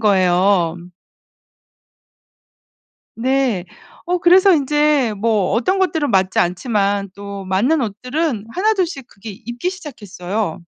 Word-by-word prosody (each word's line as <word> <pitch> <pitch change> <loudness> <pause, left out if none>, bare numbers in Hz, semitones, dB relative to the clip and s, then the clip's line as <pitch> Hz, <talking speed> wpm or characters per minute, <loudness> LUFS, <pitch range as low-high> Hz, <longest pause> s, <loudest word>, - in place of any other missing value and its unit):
거예요. 185 -3 +2 2.4
네. 250 -6 0 0.4
어 355 0 0
그래서 370 +2 +6
인제 295 -4 +2
뭐 215 -3 +1
어떤 315 - +1
것들은 320 - 0
맞지 190 -1 +1
않지만 200 +1 0
또 200 -1 -8
맞는 245 - +1
옷들은 250 +2 -2
1 430 +4 +2
2 375 -3 +1
씩 275 -7 -8
그게 210 0 -10
입기 240 - -5
시작했어요. 205 - -5
230 Hz, 205 characters per minute, -18 LUFS, 195-300 Hz, 2.4 s, 그래서